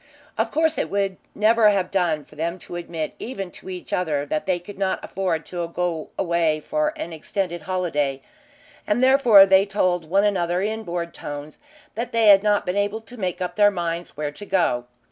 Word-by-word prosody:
Of - - 0
course 320 0 +1
it - - -1
would 195 -1 -1 0.2
never 215 +1 +5
have 195 -3 0
done 170 -6 0
for - - -18
them 165 +3 -2
to - - -8
admit 170 -2 -4
even 195 -7 -5
to - - -11
each 180 -1 -7
other 155 -5 0
that 155 +3 -3
they 185 -2 +2
could 190 +3 -11
not 190 -1 0
afford 175 -5 -2
to 175 -2 -4
go 170 -2 -3
away 170 -4 +1
for 305 - -1
an 305 - -6
extended 175 +2 -3
holiday, 150 -6 -1 0.6
and 240 +5 +1
therefore 255 -7 +7
they 195 +1 +4
told 185 -4 0
one 195 +3 +3
another 180 -4 +1
in 220 +3 -2
bored 170 -4 -4
tones 145 +1 -8 0.3
that 235 +2 -4
they 225 -2 +5
had 195 -1 +8
not 205 -1 +2
been 180 +2 -1
able 205 +2 0
to 240 +3 -13
make 185 -5 -3
up 180 - -3
their 205 -1 +6
minds 170 -4 -4
where 150 -1 -2
to 205 +8 -10
go. 125 -10 +1
185 Hz, 200 wpm, -23 LUFS, 170-205 Hz, 0.6 s, had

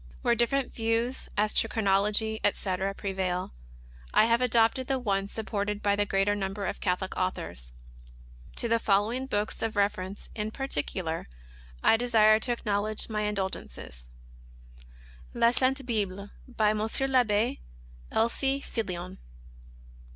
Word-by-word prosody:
Where 240 - +4
different 250 +3 0
views, 230 +3 -1
as 210 +1 +2
to 225 - +2
chronology, 210 +1 +1
etc., 195 -1 0
pre 200 -1 -4
vail, 185 - -2 0.6
I - - +7
have 230 +1 +3
adopted 240 +1 +3
the 270 - +1
one 200 -5 0
supported 210 -1 -3
by 200 0 +3
the 205 0 0
greater 195 +1 +2
nimiber 195 0 -3
of - - -4
Catholic 185 0 -1
authors. 85 - -3 0.8
To 235 - 0
the 230 0 +3
following 220 +6 +1
books 210 -4 -2
of 225 0 -1
reference 200 -1 -1
in 215 0 -3
particular 170 - -3 0.5
I 225 - +6
desire 220 -2 +5
to 245 - -2
acknowledge 215 -2 -1
my 210 -1 -1
indebtedness: 60 - -5 1.3
La 235 - +5
Sainie 265 +2 +1
Bible, 200 -4 -2 0.2
by 220 -4 +2
M. 215 - -1
TAbbe 235 -1 +1 0.5
L. 225 - +3
C. 270 +3 -1
Pillion. 180 -5 -3
210 Hz, 135 wpm, -28 LUFS, 195-230 Hz, 1.3 s, I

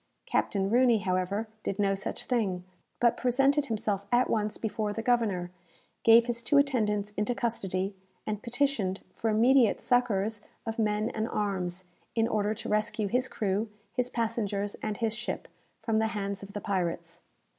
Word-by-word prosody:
Captain 195 -2 +1
Rooney, 245 -1 +5
however, 190 +2 -1
did 200 - -3
no 200 -1 +2
such 195 - -4
thing, 200 -8 0 0.4
but 235 -1 +4
presented 275 +3 +2
himself 205 -3 -1
at 245 +1 +3
once 215 -1 0
before 215 -1 -2
the 225 - -4
governor, 210 -8 +1 0.5
gave 230 +1 +7
his 235 -1 -1
two 260 +5 +3
attendants 210 -7 +2
into 210 +3 -1
custody, 195 -5 -1 0.3
and 210 -1 -3
petitioned 235 -6 0
for 225 - -1
immediate 235 +2 +4
succours 220 -4 +1 0.2
of 225 0 -4
men 215 0 +1
and 220 +1 -2
arms, 185 -3 -1 0.3
in 225 -1 +3
order 215 -1 0
to - - -6
rescue 215 0 0
his 250 +5 +1
crew, 210 -2 -1 0.2
his 250 0 0
passengers, 215 -4 -1
and 215 -1 -2
his 225 -2 0
ship, 235 +1 -4 0.3
from 225 -2 0
the 220 0 +3
hands 200 -2 -3
of 200 0 -10
the 205 - -4
pirates. 185 -4 -2
215 Hz, 160 wpm, -29 LUFS, 200-235 Hz, 0.5 s, gave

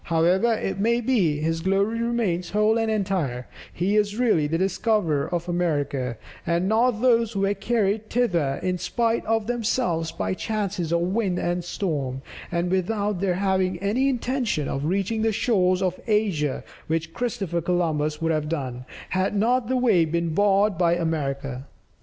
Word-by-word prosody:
However 180 +7 +3
it 195 -3 -3
may 235 +3 +2
be, 200 - +1
his 165 +1 -1
glory 200 +5 +1
remains 220 -7 -1
whole 210 +3 +2
and 225 0 0
entire; 185 - -1 0.3
he 190 +4 0
is 205 0 +1
really 220 -12 +2
the 165 +2 0
discoverer 185 -6 +1
of 175 0 -2
America, 145 -8 -1 0.3
and 170 +2 0
not 225 +1 +2
those 230 -3 +3
who 195 - -1
were 195 +1 +2
carried 210 0 0
thither 170 - +1
in 180 -1 -1
spite 230 +5 0
of 225 -1 +1
themselves 225 -8 -1
by 95 -1 -2
chances 200 - -2
of 170 0 +2
wind 190 0 0
and 175 0 -1
storm, 140 -8 -3 0.3
without 185 +3 0
their 190 -3 +1
having 190 -1 +1
any 215 +9 +1
intention 245 - -1
of 135 +1 -2
reaching 195 +6 0
the 225 0 +2
shores 190 -4 +2
of 185 -1 -1
Asia, 195 -10 0 0.2
which 160 0 -2
Christopher 210 -9 -2
Columbus 155 -3 0
would 165 0 0
have 155 -1 -1
done, 130 -6 -4 0.3
had 185 +2 0
not 235 +3 +2
the 260 +1 +1
way 225 -9 +4
been 170 0 -1
barred 200 0 +3
by 170 -1 +3
America. 140 -5 -2
185 Hz, 160 wpm, -24 LUFS, 165-220 Hz, 0.3 s, way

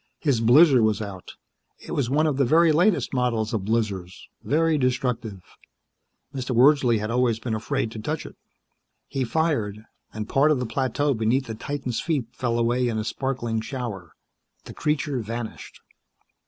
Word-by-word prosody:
His 135 -7 +1
blizzer 130 +3 +6
was 110 -1 +2
out. 100 -4 -8 0.4
It - - -11
was 130 -5 -1
one 150 +4 +2
of 150 -4 0
the 140 - +3
very 160 +5 +4
latest 175 +5 +2
models 120 -4 0
of 110 - 0
blizzers. 100 -5 -2 0.2
Very 160 +2 +2
destructive. 125 -6 -1 0.9
Mr. 130 -2 -3
Wordsley 130 -2 +5
had 105 +1 -3
always 120 -2 +2
been 115 0 -4
afraid 110 +1 -2
to 110 - -7
touch 150 +8 -3
it. - - -10 0.7
He 135 - -2
fired, 115 -7 -1 0.3
and 110 -1 -5
part 140 +5 +3
of 155 - +3
the 125 - -2
plateau 135 +4 0
beneath 115 +4 0
the 115 - -5
titan's 130 0 -4
feet 150 -8 -1
fell 120 -2 -2
away 120 +2 +1
in 115 -2 -1
a 110 - -1
sparkling 120 -2 -2
shower. 110 - -6 0.5
The - - -9
creature 150 -3 -1
vanished. 115 0 -7
125 Hz, 165 wpm, -24 LUFS, 110-140 Hz, 0.9 s, blizzer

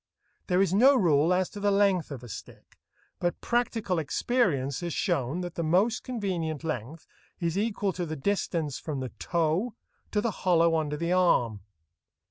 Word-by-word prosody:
There 185 +1 +3
is 190 - 0
no 260 +8 +6
rule 165 - +3
as 180 0 +2
to 205 - -8
the 205 0 +2
length 195 -4 +2
of 135 -4 -7
a - - -9
stick, 110 - -11 0.4
but 175 0 -1
practical 230 -6 0
experience 145 - 0
has 175 -2 -4
shown 140 +7 0
that 175 -1 -5
the 170 - -3
most 190 +9 +2
convenient 180 - -3
length 155 0 -5 0.3
is 170 -1 -1
equal 205 -2 0
to 175 -1 -3
the 155 - -4
distance 160 -3 -1
from 150 -4 -4
the 130 -1 -4
toe 170 +7 0 0.3
to 210 - 0
the 230 +1 0
hollow 170 -3 +3
under 150 -2 -1
the 170 +2 -2
arm. 125 - +3
175 Hz, 170 wpm, -28 LUFS, 155-200 Hz, 0.4 s, no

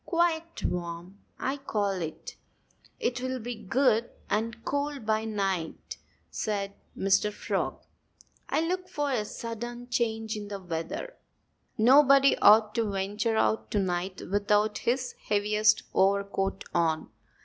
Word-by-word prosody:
"Quite 335 -1 0
warm 175 +2 -4 0.2
I 270 +2 -1
call 210 -7 -1
it!" 170 -5 -5 0.6
"It'll 255 +1 -1
be 245 0 -5
good 235 +1 +1 0.2
and 225 +2 -1
cold 285 -3 -2
by 220 0 +1
night," 195 -6 -3 0.3
said 200 -2 -2 0.2
Mr. 195 +2 +2
Frog. - - -3 0.7
"I - - +2
look 365 +2 -2
for 290 -5 -1
a 235 -5 +1
sudden 240 +3 -6
change 225 -2 -1
in 210 -1 -6
the 200 -1 -5
weather. 180 - -5 0.6
Nobody 275 +3 +6
ought 215 0 +6
to 225 -2 0
venture 205 +3 -1
out 220 - +1
to 205 - +1
night 185 0 -2
without 205 +1 +2
his 250 +1 0 0.2
heaviest 210 +1 +3
overcoat 195 0 +1
on." 160 -2 0
215 Hz, 125 wpm, -28 LUFS, 195-250 Hz, 0.7 s, Nobody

